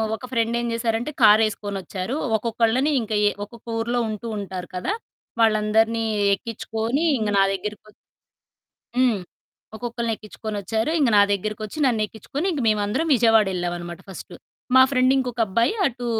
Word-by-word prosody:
ఒక 255 - -9
ఫ్రెండ్ 230 -1 +1
ఏం 240 - -2
జేశారంటే 230 +3 -1
కారేసుకొనొచ్చారు. 210 +1 +2 0.2
ఒక్కొక్కళ్ళని 230 +5 +1
ఇంక 225 -1 -7 0.2
ఏ - - +3
ఒక్కొక్క 235 +2 -17
ఊర్లో 240 +2 0
ఉంటూ 215 +2 -5
ఉంటారు 185 -2 -6
కదా! 180 - -1 0.5
వాళ్ళందరినీ 220 +1 +3 0.3
ఎక్కించుకొని 225 +5 -3 0.2
ఇంగ 215 -2 -1
నా - - +6
దగ్గరకొ 210 +2 -6 1.1
హ్మ్. 250 -5 +3 0.6
ఒక్కొక్కళ్ళని 235 0 -3
ఎక్కిచ్చుకొనొచ్చారు. 215 +3 -3
ఇంగ 275 - +3
నా - - +8
దగ్గరకొచ్చి 215 +4 -4
నన్ను 230 -4 +2
ఎక్కిచ్చుకొని 250 - -6
ఇంక 300 -5 -2
మేమందరం 215 +9 +1
విజయవాడ 225 -4 +4
ఏళ్ళామనమాట 175 -1 -4
ఫస్టు. 190 - -9 0.4
మా 260 - +9
ఫ్రెండ్ 255 -1 +3
ఇంకొక 250 -2 -2
అబ్బాయి 230 - +1
అటూ 245 -2 -2
225 Hz, 135 wpm, -23 LUFS, 210-240 Hz, 1.1 s, మా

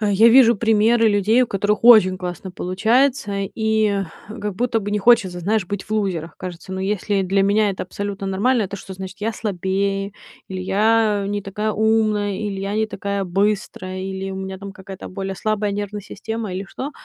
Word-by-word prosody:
А, 210 -1 +1
я 205 +3 +5
вижу 235 -2 +6
примеры 225 +1 +3
людей, 215 +4 +3
у - - +1
которых 205 +1 -1
очень 215 -6 +7
классно 180 +1 -6
получается, 220 +6 +1 0.2
и 220 -2 +1 0.3
как 210 -2 -5
будто 235 -1 0
бы 205 - -4
не 210 - +1
хочется, 200 -5 +3
знаешь, 210 +3 0
быть 205 +1 -4
в - - -22
лузерах, 180 -7 -2
кажется. 180 0 -8
Но 190 - -3
если 200 0 0
для 195 +1 +1
меня 205 +1 +3
это 190 - -4
абсолютно 200 +1 -5
нормально, 215 +5 +1
это 200 0 -4
что 190 0 -9
значит: 190 +1 -8
я 225 +2 -1
слабее, 195 0 -2 0.4
или 185 -1 -5
я 210 +1 +2
не 205 0 -2
такая 210 +2 -2
умная, 215 -1 +1
или 205 -2 -4
я 195 +1 -3
не 220 0 +1
такая 200 -1 -3
быстрая, 185 0 -1
или 190 0 -4
у 190 - -6
меня 190 0 -5
там 200 0 -8
какая-то 190 0 -10
более 195 0 -5
слабая 215 0 -1
нервная 205 0 -4
система, 220 +1 -5
или 190 +2 -4
что? 275 +3 -5
205 Hz, 190 wpm, -21 LUFS, 190-220 Hz, 0.4 s, очень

